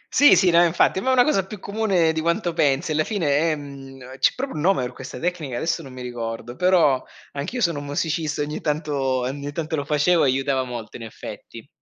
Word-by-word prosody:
Sì, 290 +2 +7
sì 180 -3 +4
no 170 +1 +6
infatti, 175 +2 +2
ma 260 - -1
è - - +4
una 250 -1 +6
cosa 245 -11 +2
più 200 +3 -9
comune 200 -6 +1
di 160 - -2
quanto 170 +1 0
pensi, 140 -1 +1
alla 155 0 +2
fine 165 -9 0
è 160 +2 +2
mhmm, 135 -2 -10
c'è - - +4
proprio 270 +1 -4
un - - -3
nome 185 -4 +2
per 125 0 -5
questa 130 +1 -9
tecnica, 165 -7 -3
adesso 165 +3 -1
non 135 - -11
mi 130 0 -8
ricordo, 120 0 -5
però 165 -6 +3 0.3
anch'io 145 - -4
sono 170 -7 +1
un 145 - -8
musicista, 150 +1 -2
ogni 150 +1 -5
tanto 150 -1 -2 0.3
ogni 140 +3 -4
tanto 160 -1 -3
lo 145 - -2
facevo 150 +4 +3
e - - +4
aiutava 135 0 0
molto 120 -3 -7
in 120 - -13
effetti. 115 - -10
150 Hz, 225 wpm, -23 LUFS, 135-175 Hz, 0.3 s, Sì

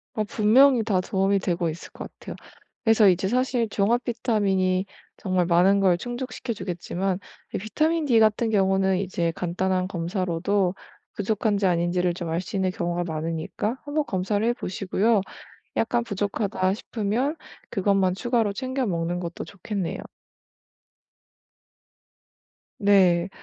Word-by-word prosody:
어 215 - 0
분명히 235 +4 +4
다 205 -4 +1
도움이 195 +1 +1
되고 175 -2 -1
있을 160 +2 -8
것 - - -9
같아요. - - -8 0.5
그래서 225 -2 +5
이제 185 0 +3
사실 250 -1 +1
종합 225 +5 +1
비타민이 200 -6 +1 0.3
정말 185 -2 0
많은 180 +3 +4
걸 185 -3 +3
충족시켜 245 +3 -5
주겠지만 185 -1 -3 0.4
이 - - 0
비타민 310 - 0
D 240 -5 +4
같은 220 +1 +3
경우는 190 -2 +2
이제 175 -3 -1
간단한 185 +1 -1
검사로도 185 +1 -1 0.4
부족한지 205 0 0
아닌지를 175 0 +1
좀 170 -1 -5
알 165 +2 -1
수 185 - -8
있는 190 -1 +1
경우가 175 0 -2
많으니까 165 +8 -3
한번 295 +1 0
검사를 200 +3 -1
해보시고요. 210 -2 +1 0.5
약간 240 +1 +1
부족하다 200 -2 -1
싶으면 230 +7 -2 0.3
그것만 195 -2 +2
추가로 230 -1 0
챙겨 260 +3 -2
먹는 175 -2 -1
것도 170 -1 -5
좋겠네요. 200 -2 -4 2.8
네. 190 -4 +4
195 Hz, 300 characters per minute, -25 LUFS, 180-225 Hz, 2.8 s, 그래서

